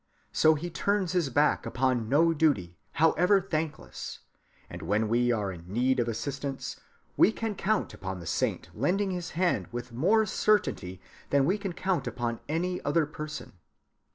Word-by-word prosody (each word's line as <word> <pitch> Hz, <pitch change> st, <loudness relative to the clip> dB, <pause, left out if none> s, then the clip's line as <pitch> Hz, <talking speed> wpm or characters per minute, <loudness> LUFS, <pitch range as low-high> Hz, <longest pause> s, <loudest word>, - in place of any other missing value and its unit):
So 155 Hz, 0 st, +5 dB
he 170 Hz, +4 st, -5 dB
turns 200 Hz, 0 st, 0 dB
his 175 Hz, -6 st, +1 dB
back 145 Hz, +4 st, +2 dB
upon 125 Hz, -3 st, 0 dB
no 165 Hz, +5 st, +4 dB
duty, 140 Hz, -, +1 dB, 0.2 s
however 180 Hz, +5 st, +4 dB
thankless; 160 Hz, -5 st, -4 dB, 0.5 s
and -, -, -8 dB
when 105 Hz, +6 st, +1 dB
we 120 Hz, +2 st, +2 dB
are 105 Hz, -4 st, 0 dB
in 85 Hz, 0 st, -10 dB
need 125 Hz, +4 st, +2 dB
of 120 Hz, -, +1 dB
assistance, 135 Hz, +4 st, -4 dB, 0.4 s
we -, -, +5 dB
can 225 Hz, -1 st, -3 dB
count 210 Hz, +2 st, 0 dB
upon 95 Hz, -1 st, -5 dB
the 85 Hz, -, -9 dB
saint -, -, -1 dB
lending 190 Hz, -, 0 dB
his 180 Hz, -1 st, -4 dB
hand 180 Hz, -1 st, +1 dB
with 120 Hz, +1 st, -6 dB
more 215 Hz, -, +3 dB
certainty 185 Hz, -, +1 dB, 0.3 s
than 140 Hz, -1 st, +3 dB
we 195 Hz, +6 st, +1 dB
can 195 Hz, -3 st, -4 dB
count 185 Hz, +1 st, -1 dB
upon 120 Hz, -2 st, -2 dB
any 180 Hz, +3 st, -1 dB
other 150 Hz, +2 st, +2 dB
person. 150 Hz, 0 st, -7 dB
150 Hz, 160 wpm, -28 LUFS, 120-180 Hz, 0.5 s, So